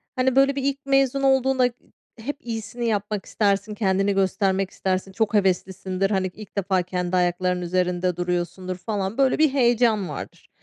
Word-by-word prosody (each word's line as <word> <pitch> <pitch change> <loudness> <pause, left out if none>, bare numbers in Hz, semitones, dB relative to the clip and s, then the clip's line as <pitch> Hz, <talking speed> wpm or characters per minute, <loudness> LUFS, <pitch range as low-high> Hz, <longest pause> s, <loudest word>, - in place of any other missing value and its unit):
hani, 255 0 +1
böyle 275 0 +4
bir 275 - -2
ilk 275 0 0
mezun 275 0 +2
olduğunda, 265 -1 +3
ııı, 245 - +3 0.5
hep 280 +5 -4
iyisini 230 +1 -4
yapmak 205 -1 -2
istersin, 205 0 0
kendini 195 -1 +1
göstermek 195 0 +1
istersin, 190 0 -2
çok 220 +2 -1
heveslisindir, 190 -1 0
hani, 190 -1 +1
ilk 210 -1 -12
defa 190 -1 +1
kendi 180 0 -2
ayaklarının 180 0 +1
üzerinde 180 0 0
duruyorsundur 180 +1 -3
falan, 195 +1 -3
böyle 270 -1 +3
bir 310 -1 +4
heyecan 235 -6 +2
vardır. - - -8
200 Hz, 160 wpm, -24 LUFS, 185-240 Hz, 0.5 s, böyle